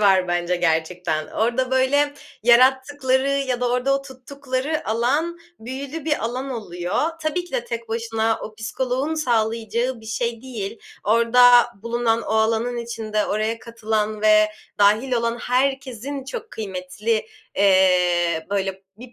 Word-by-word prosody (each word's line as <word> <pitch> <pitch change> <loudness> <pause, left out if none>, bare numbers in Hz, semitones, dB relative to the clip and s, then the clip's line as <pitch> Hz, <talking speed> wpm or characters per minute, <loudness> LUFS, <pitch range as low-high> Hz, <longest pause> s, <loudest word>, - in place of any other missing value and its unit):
var 190 -3 +4
bence 175 0 0
gerçekten. 160 -1 0
Orada, 245 +3 0
böyle, 285 +3 +2 0.3
yarattıkları 260 +2 +3
ya 270 -3 -1
da 245 - +1
orada 250 +3 +1
o - - -11
tuttukları 275 +2 -4
alan 280 +10 0 0.2
büyülü 270 +6 -6
bir 300 -7 0
alan 255 +4 -3
oluyor. 205 - -2
Tabii 330 +3 -1
ki 355 - -17
de - - -1
tek 230 -1 -5
başına 225 0 -1
o 215 - -7
psikoloğun 255 +7 -2
sağlayacağı 230 -2 0
bir 220 - -14
şey 230 +1 -2
değil. 225 -7 -6 0.3
Orada 240 +2 +6 0.2
bulunan, 235 -1 0
o - - -6
alanın 225 +2 +1
içinde 220 -2 -2
oraya 215 +2 -1
katılan 220 -2 -2
ve 215 0 +5 0.3
dâhil 215 +6 +3
olan 235 0 0
herkesin 265 +1 -1
çok 450 - -7
kıymetli, 210 +2 -3 0.3
eee, 180 -4 +3
böyle, 195 -1 -2
bir 245 +2 -12
235 Hz, 135 wpm, -22 LUFS, 215-260 Hz, 0.3 s, Orada